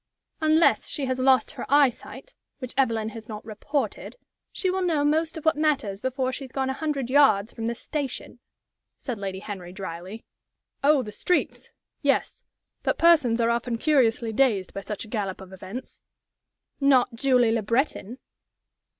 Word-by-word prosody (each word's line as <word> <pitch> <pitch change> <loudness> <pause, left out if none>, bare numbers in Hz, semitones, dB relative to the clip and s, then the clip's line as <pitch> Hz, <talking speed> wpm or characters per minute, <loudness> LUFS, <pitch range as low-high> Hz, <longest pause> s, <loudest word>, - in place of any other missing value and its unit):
"Unless 315 +1 +3
she 285 - -3
has 260 0 -2
lost 260 -2 +3
her - - -7
eyesight 285 - +1 0.2
which 255 -3 -7
Evelyn 230 -5 +1
has 225 +1 -10
not 210 0 -7
reported 250 - -3 0.4
she 375 - -2
will 380 +1 -1
know 320 -5 +1
most 320 +2 +1
of 320 - -8
what 320 - +4
matters 280 -10 0
before 260 0 -1
she 275 - -5
has 260 - -10
gone 265 0 -1
a - - -2
hundred 285 -3 -2
yards 245 -6 +4
from 225 -1 -4
the 235 - -2
station," 270 -2 -5 0.6
said 245 -6 -5
Lady 195 -1 -4
Henry, 190 -4 -7
dryly. 190 +2 -7 0.6
"Oh, 285 -2 +4
the 210 - -7
streets! 355 - -1 0.3
Yes; - - 0 0.4
but - - 0
persons 300 -9 +4
are 230 0 +3
often 235 0 -1
curiously 235 -5 +2
dazed 215 -7 +1
by 195 - -5
such 210 +2 -6
a - - -14
gallop 205 -4 -3
of 190 0 -12
events." 190 +7 -9 0.8
"Not 265 -3 +4
Julie 250 -1 +3
Le 225 0 +1
Breton!" 235 +1 -1
250 Hz, 165 wpm, -25 LUFS, 220-285 Hz, 0.8 s, what